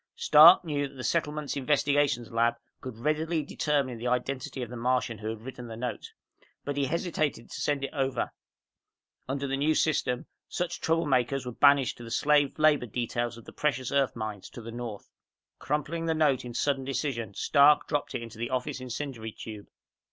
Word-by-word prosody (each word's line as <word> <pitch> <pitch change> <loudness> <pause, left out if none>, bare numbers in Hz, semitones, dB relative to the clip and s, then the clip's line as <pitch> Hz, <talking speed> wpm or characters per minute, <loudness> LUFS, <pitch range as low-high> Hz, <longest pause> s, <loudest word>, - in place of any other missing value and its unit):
_ - - -21
Stark 175 - +8
knew 145 -3 -1
that 140 - -16
the 130 - -7
Settlement's 150 +1 -1
Investigations 140 -3 +1
Lab 115 +1 +2 0.2
could 130 -5 -8
readily 155 +4 0
determine 140 -4 -1
the 120 - -3
identity 130 +1 -2
of 120 - -8
the - - -6
Martian 120 -2 0
who 110 0 -4
had 110 -1 -5
written 125 -1 -8
the 115 -1 -8
note. 125 0 -5 0.5
But 145 - -2
he 140 -1 +1
hesitated 155 -4 -2
to - - -6
send 145 -2 0
it 135 - -4
over. 135 -4 -1 1.0
Under 135 +1 -2
the 135 0 -1
New 155 +3 +2
System, 125 -5 +1 0.2
such 180 -1 -3
troublemakers 135 -5 +1
were 125 - -4
banished 140 +1 +4
to 120 - -10
the 115 - -8
slave 145 +3 +2
labor 155 -5 +3
details 120 +1 -2
of 115 - -13
the - - -12
precious 130 -4 -1
earth 140 -2 +1
mines 110 -4 -5
to 120 - -10
the 115 - -7
North. 115 -3 -6 0.5
Crumpling 165 +3 -2
the 160 - +1
note 150 -5 +2
in 120 -1 -7
sudden 140 -2 0
decision, 130 -6 -3
Stark 145 +1 +5
dropped 145 -2 -2
it 120 - -3
into 115 -1 -10
the 120 - -2
office 130 +1 -2
incendiary 125 -3 -5
tube. 105 -1 -9
135 Hz, 190 wpm, -28 LUFS, 120-150 Hz, 1.0 s, Stark